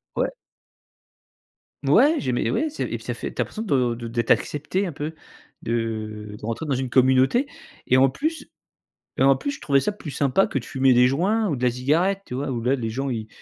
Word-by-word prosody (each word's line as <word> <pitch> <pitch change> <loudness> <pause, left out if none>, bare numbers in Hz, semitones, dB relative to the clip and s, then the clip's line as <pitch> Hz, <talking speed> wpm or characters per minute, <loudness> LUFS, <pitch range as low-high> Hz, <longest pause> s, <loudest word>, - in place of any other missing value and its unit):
Ouais. - - 0 1.6
Ouais, 305 +3 +5
j'aimais, 120 -2 -1
ouais, 310 - 0
c'est 305 - -4
et - - -3
puis - - -15
ça - - -4
fait - - -6
tu - - -2
as - - +3
l'impression 220 - -6
de 125 - +1
de 120 0 -7
d'être 115 0 -2
accepté 155 +7 +1
un 175 - -3
peu, 155 +2 -5 0.5
de 110 -2 -3
de - - -8
rentrer 115 +8 -3
dans 140 - +1
une 130 -1 -3
communauté 130 - +4 0.4
et 130 - +4
en 135 +1 +6
plus 315 - -3 0.7
et - - +1
en 135 0 +5
plus, 285 - -3
je - - -9
trouvais 140 -3 +3
ça 210 - -1
plus 165 -7 -8
sympa 140 +7 +2
que 135 - -2
de 120 - -8
fumer 130 0 +3
des 125 +1 +6
joints 200 - +1
ou 150 - 0
de 125 - -7
la 125 - +4
cigarette. 165 +11 +1
Tu 125 - -8
vois, 140 +2 -3
où, 120 -3 -3
là, 130 +3 +2
les 120 -4 -3
gens, 135 +4 -3
ils 110 -3 -4
135 Hz, 230 wpm, -23 LUFS, 120-165 Hz, 1.6 s, en